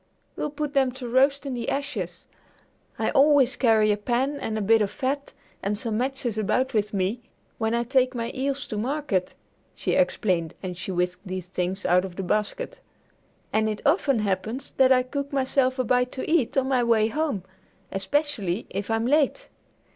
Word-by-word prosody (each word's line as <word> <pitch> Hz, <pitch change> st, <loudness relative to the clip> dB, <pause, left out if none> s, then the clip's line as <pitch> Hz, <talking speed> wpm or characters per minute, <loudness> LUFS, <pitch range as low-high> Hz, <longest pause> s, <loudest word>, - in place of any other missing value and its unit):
We'll 300 Hz, -, -2 dB
put 295 Hz, 0 st, -4 dB
them 265 Hz, -2 st, +3 dB
to 255 Hz, -1 st, -7 dB
roast 275 Hz, +4 st, +3 dB
in 275 Hz, -, -3 dB
the 240 Hz, -1 st, -3 dB
ashes. 210 Hz, -, -3 dB, 0.7 s
I -, -, 0 dB
always 275 Hz, -3 st, +5 dB
carry 220 Hz, -4 st, +4 dB
a 205 Hz, -, +1 dB
pan 255 Hz, +6 st, -1 dB
and 220 Hz, -, -3 dB
a -, -, -1 dB
bit 225 Hz, +2 st, +4 dB
of 205 Hz, -, +1 dB
fat 280 Hz, +5 st, -3 dB, 0.3 s
and 205 Hz, +1 st, -1 dB
some 220 Hz, -1 st, -1 dB
matches 255 Hz, -4 st, -1 dB
about 255 Hz, +6 st, +1 dB
with 210 Hz, -1 st, +1 dB
me 200 Hz, +3 st, -1 dB, 0.4 s
when 225 Hz, 0 st, +1 dB
I 235 Hz, -, +1 dB
take 255 Hz, +1 st, +2 dB
my 230 Hz, 0 st, -2 dB
eels 275 Hz, +1 st, -2 dB
to 210 Hz, -, -2 dB
market," 250 Hz, -7 st, -1 dB, 0.4 s
she -, -, -2 dB
explained 185 Hz, -, +1 dB
as 180 Hz, -1 st, -4 dB
she 180 Hz, +2 st, -5 dB
whisked 180 Hz, +2 st, -2 dB
these 185 Hz, -1 st, -5 dB
things 185 Hz, +2 st, -2 dB
out 180 Hz, +1 st, +4 dB
of 185 Hz, -2 st, -7 dB
the 195 Hz, -, -4 dB
basket, 485 Hz, -, -2 dB, 0.7 s
"and 220 Hz, 0 st, +2 dB
it 215 Hz, -, -4 dB
often 285 Hz, -3 st, +3 dB
happens 215 Hz, +6 st, -2 dB
that 265 Hz, -1 st, +5 dB
I 255 Hz, -1 st, +5 dB
cook 280 Hz, +2 st, -4 dB
myself 260 Hz, -1 st, +1 dB
a 255 Hz, -, +1 dB
bite 250 Hz, +1 st, +2 dB
to 260 Hz, -, -4 dB
eat 310 Hz, -6 st, +1 dB
on 265 Hz, -1 st, +2 dB
my 255 Hz, -2 st, +2 dB
way 225 Hz, -2 st, +3 dB
home, 285 Hz, -, -1 dB, 0.5 s
especially 220 Hz, -, -1 dB
if 200 Hz, +2 st, -4 dB
I'm 225 Hz, 0 st, +1 dB
late. 300 Hz, -, +2 dB
240 Hz, 185 wpm, -25 LUFS, 205-275 Hz, 0.7 s, always